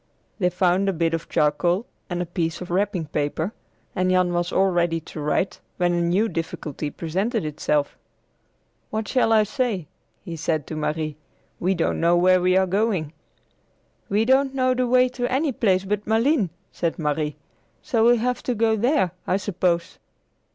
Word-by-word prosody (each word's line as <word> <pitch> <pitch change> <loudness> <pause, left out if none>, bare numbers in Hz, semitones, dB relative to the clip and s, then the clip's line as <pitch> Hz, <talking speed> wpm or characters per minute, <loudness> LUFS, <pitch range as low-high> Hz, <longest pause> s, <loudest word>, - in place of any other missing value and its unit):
They 180 -3 +3
found 185 +2 +2
a - - 0
bit 165 -1 0
of 165 - -3
charcoal 170 +8 +1 0.2
and 175 -1 -1
a - - -6
piece 165 -1 -2
of 180 -1 -7
wrapping 190 -2 0
paper, 155 +6 -2 0.4
and 185 0 +1
Jan 185 -1 +2
was 175 0 -1
all 190 0 +3
ready 170 -2 +1
to 160 - -10
write 150 +6 -1 0.2
when 175 -1 +2
a 175 - +1
new 180 +6 +2
difficulty 160 -5 -4
presented 190 - -2
itself. 150 -1 -1 0.9
"What 220 0 -3
shall 250 -4 +2
I 220 -1 +5
say?" 220 - -1 0.4
he 170 - -5
said 155 -2 -1
to 155 - -6
Marie. 155 0 -2 0.4
"We 185 +2 +1
don't 165 - 0
know 170 +1 +4
where 185 +1 +4
we 185 +1 +3
are 190 - +4
going!" 190 -5 0 1.0
"We 210 +3 +2
don't 265 +2 +3
know 255 -1 +2
the 255 0 0
way 255 +1 +5
to 245 0 -3
any 280 +3 +1
place 195 -6 +1
but 210 +1 -2
Malines," 225 - +2 0.2
said 170 -2 -2
Marie; 150 -1 -1 0.5
"so 230 -6 +1
we'll 240 +1 +6
have 250 +2 -1
to 250 - -2
go 225 0 +2
there, 240 - +2 0.2
I 185 - +2
suppose." 180 -3 -1
185 Hz, 175 wpm, -23 LUFS, 165-220 Hz, 1.0 s, we'll